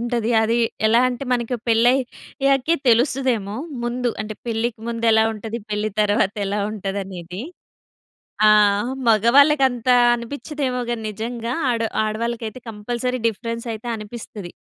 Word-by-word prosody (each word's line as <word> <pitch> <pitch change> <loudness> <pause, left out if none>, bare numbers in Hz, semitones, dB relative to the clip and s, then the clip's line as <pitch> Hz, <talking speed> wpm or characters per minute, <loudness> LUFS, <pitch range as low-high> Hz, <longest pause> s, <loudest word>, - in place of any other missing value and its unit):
ఉంటది. 235 -1 -1
అది 230 +2 +1 0.3
ఎలా 230 +2 +4
అంటే 250 +2 -4
మనకి 245 0 -1
పెళ్ళయ్యాకే 260 +4 +1
తెలుస్తదేమో! 240 -4 +2 0.3
ముందు 240 0 -1
అంటే 215 0 -6
పెళ్ళికి 225 0 -2
ముందెలా 230 -1 +3
ఉంటది, 220 +1 -6
పెళ్ళి 210 +1 -1
తర్వాతెలా 205 0 +1
ఉంటదనేది. 195 -2 -5 1.1
ఆ! - - +8 0.6
మగవాళ్ళకి 270 +7 +5
అంత 245 -1 -8 0.3
అనిపించదేమో 255 +1 -4
గాని 235 -2 -3
నిజంగా 230 +2 -4 0.2
ఆడ 230 -1 0 0.2
ఆడవాళ్ళకైతే 230 +2 -3
కంపల్సరీ 240 +4 -3
డిఫరెన్స్ 230 +2 -4
అయితే 220 +2 -8
అనిపిస్తది. 210 -4 -8
230 Hz, 110 wpm, -21 LUFS, 215-245 Hz, 1.1 s, ఆ